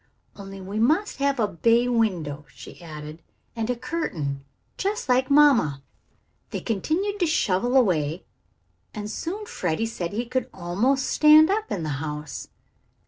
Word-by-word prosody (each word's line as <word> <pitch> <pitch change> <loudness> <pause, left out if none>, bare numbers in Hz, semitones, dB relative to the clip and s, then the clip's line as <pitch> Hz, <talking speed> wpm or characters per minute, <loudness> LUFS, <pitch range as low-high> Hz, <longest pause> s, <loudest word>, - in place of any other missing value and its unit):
"Only 195 -1 -9
we 195 +3 -5
must 315 - +2
have 275 -1 0
a 215 - +3
bay 230 +7 +2
window," 175 -12 -1
she - - -13
added. 155 -1 -9 0.3
"And 225 0 -2
a 250 - +1
curtain, 155 - -3 0.3
just 415 +2 -2
like 255 +1 +2
mamma." 265 - +4 0.7
They - - -4
continued 335 - -1
to 350 - +2
shovel 245 - +1
away, 170 - +1 0.7
and 210 0 -5
soon 395 - -4
Freddie 180 - -2
said 180 -7 -4
he 230 +4 -2
could 255 +1 -2
almost 210 +10 0
stand 310 +3 +6
up 430 +2 -1
in 175 - -2
the 155 - -3
house. 150 -1 -5
225 Hz, 145 wpm, -25 LUFS, 170-280 Hz, 0.7 s, stand